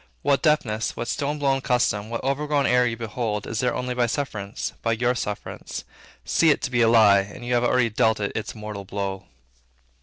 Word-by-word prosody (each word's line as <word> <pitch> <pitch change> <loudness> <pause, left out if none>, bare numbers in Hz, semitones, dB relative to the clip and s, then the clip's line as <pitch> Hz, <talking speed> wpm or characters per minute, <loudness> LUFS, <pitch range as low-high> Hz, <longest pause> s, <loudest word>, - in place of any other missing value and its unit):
What 140 -1 +2
deafness, 130 -9 +1
what 120 - -3
stone 145 +3 -1
blind 135 -2 +1
custom, 110 -5 +1
what 115 0 -4
overgrown 145 +1 0
error 125 0 +4
you 115 -1 -3
behold, 110 -2 -3
is 110 - -3
there 125 -1 +1
only 125 0 -2
by 125 -1 +1
sufferance, 110 -6 -4
by 115 - +1
your 120 +2 +1
sufferance. 105 -4 -5 0.4
See 165 - +3
it 150 - +4
to 125 - -2
be 120 -1 +2
a 115 - +5
lie, 110 -4 +6
and 100 +5 -6
you 125 - -1
have 120 0 +2
already 120 -2 +2
dealt 110 0 +2
it 100 - -1
its 110 - -4
mortal 105 -2 -6
blow. 95 -1 -4
120 Hz, 205 wpm, -24 LUFS, 105-125 Hz, 0.4 s, lie